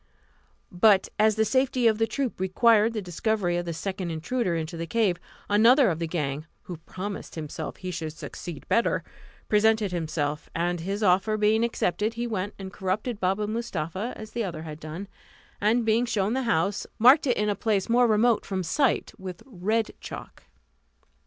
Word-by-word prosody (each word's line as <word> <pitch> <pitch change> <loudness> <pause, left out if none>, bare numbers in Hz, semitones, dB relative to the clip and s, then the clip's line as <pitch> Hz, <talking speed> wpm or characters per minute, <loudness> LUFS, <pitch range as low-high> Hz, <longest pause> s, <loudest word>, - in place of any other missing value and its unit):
But 190 +2 +4
as 215 0 +4
the 220 0 +2
safety 260 0 +1
of 220 -1 +4
the 225 - +2
troop 260 -1 -3
required 220 +4 +4
the 215 -3 -3
discovery 180 0 -1
of 175 - -2
the 170 - -3
second 185 +2 -4
intruder 180 +4 -1
into 165 +1 -3
the 165 0 -4
cave, 205 -2 +1 0.3
another 230 +4 +5
of 160 - -3
the 165 - -2
gang, 150 -2 -3 0.2
who 175 - -7
promised 190 +5 -7
himself 155 -1 -5
that - - -23
he 185 -1 -4
should 160 -2 -4
succeed 160 0 -8
better, 230 - +2 0.4
presented 215 -1 +3
himself, 155 -3 -2
and 175 +1 0
his 195 +5 -3
offer 195 +3 +3
being 215 +2 +3
accepted, 220 -1 0
he 235 +1 -2
went 205 -3 -3
and 190 -1 -8
corrupted 205 +4 -2
Baba 195 +3 0
Mustapha, 215 -2 -3
as 215 0 -9
the 235 - -2
other 165 -5 -5
had 155 -1 -8
done; 160 +6 -7 0.5
and 225 +3 +2
being 225 +2 +2
shown 210 -1 0
the 265 - 0
house, 195 0 0
marked 265 +6 +6
it 245 - +2
in 210 - +1
a 205 - +2
place 200 -1 0
more 240 +1 +4
remote 225 +1 +3
from 190 -2 -3
sight, 260 - +1
with 185 -2 -8
red 220 -1 -1
chalk. - - -9
205 Hz, 180 wpm, -26 LUFS, 175-225 Hz, 0.5 s, marked